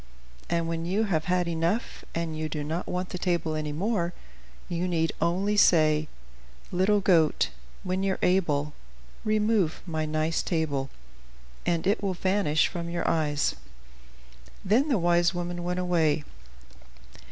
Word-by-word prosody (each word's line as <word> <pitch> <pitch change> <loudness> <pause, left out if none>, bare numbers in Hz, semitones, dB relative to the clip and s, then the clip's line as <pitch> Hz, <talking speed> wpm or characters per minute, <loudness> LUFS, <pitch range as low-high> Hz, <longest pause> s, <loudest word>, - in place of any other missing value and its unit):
And 170 -1 0
when 165 0 -2
you 200 +5 +1
have 170 -7 0
had 180 0 +1
enough, 170 +7 -1
and 165 -1 -2
you 155 0 -3
do 150 0 -3
not 160 +4 -3
want 180 0 -3
the 180 - -5
table 170 -3 0
any 155 -1 -2
more, 175 +1 -1 0.5
you 175 0 -1
need 165 -2 +1
only 190 +5 +1
say: 155 -6 +4 0.6
"'Little 195 +3 +3
goat, 170 -5 +3 0.3
when 185 0 -1
you're 195 -1 0
able, 150 -6 +2 0.5
Remove 215 -5 +1
my 155 -3 -2
nice 155 +1 0
table,' 145 -5 -1 0.8
and 170 -1 +1
it 205 +3 +2
will 195 -2 -1
vanish 185 -4 +2
from 170 -2 -5
your 170 0 -2
eyes." 150 -3 +1 1.1
Then 230 +10 +3
the 265 -6 +2
wise 175 0 +3
woman 175 0 -3
went 180 +1 -1
away. 165 -4 +2
175 Hz, 140 wpm, -27 LUFS, 160-185 Hz, 1.1 s, say